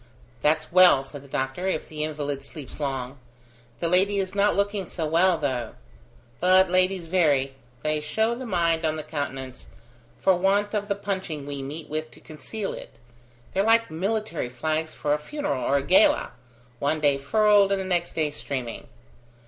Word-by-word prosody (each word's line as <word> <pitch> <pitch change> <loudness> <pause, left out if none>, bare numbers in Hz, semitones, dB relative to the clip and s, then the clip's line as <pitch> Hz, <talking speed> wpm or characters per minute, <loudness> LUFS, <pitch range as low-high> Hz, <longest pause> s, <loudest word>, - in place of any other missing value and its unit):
"That's 155 +1 +1
well," 180 -6 +7
said 140 0 -10
the - - -14
doctor, 135 +7 -2
"if 185 - -2
the 150 -1 -4
invalid 145 -2 -3
sleeps 145 0 -9
long. 135 -2 -3 0.6
The 170 - +1
lady 190 +4 +3
is 190 -1 -1
not 205 +1 +3
looking 200 -2 -1
so 165 - -3
well, 170 +3 +3
though. 130 -6 -2 0.6
But 185 0 +5
ladies 185 -1 +2
vary; 150 -6 +2 0.3
they 155 0 0
show 220 +10 0
the 250 +1 -6
mind 170 -4 +1
on 155 -1 +1
the 155 - -5
countenance, 135 -4 -5 0.5
for 190 - +4
want 200 +3 +1
of 205 -1 -1
the 200 - 0
punching 190 -7 -4
we 140 -1 -5
meet 150 +3 -7
with 155 +1 -4
to - - -16
conceal 160 +8 -6
it; - - -10 0.6
they're 195 - +2
like 225 -1 +3
military 195 - -2
flags 155 +5 -2
for 145 - 0
a 150 - 0
funeral 290 - -3
or 140 - +2
a 140 - -1
gala; 185 +8 +4 0.5
one 145 +2 0
day 145 -2 +2
furled, 205 +6 +4
and 190 -1 0
next 175 -2 -1
day 155 -2 0
streaming. 130 -5 -5
160 Hz, 175 wpm, -25 LUFS, 145-195 Hz, 0.6 s, well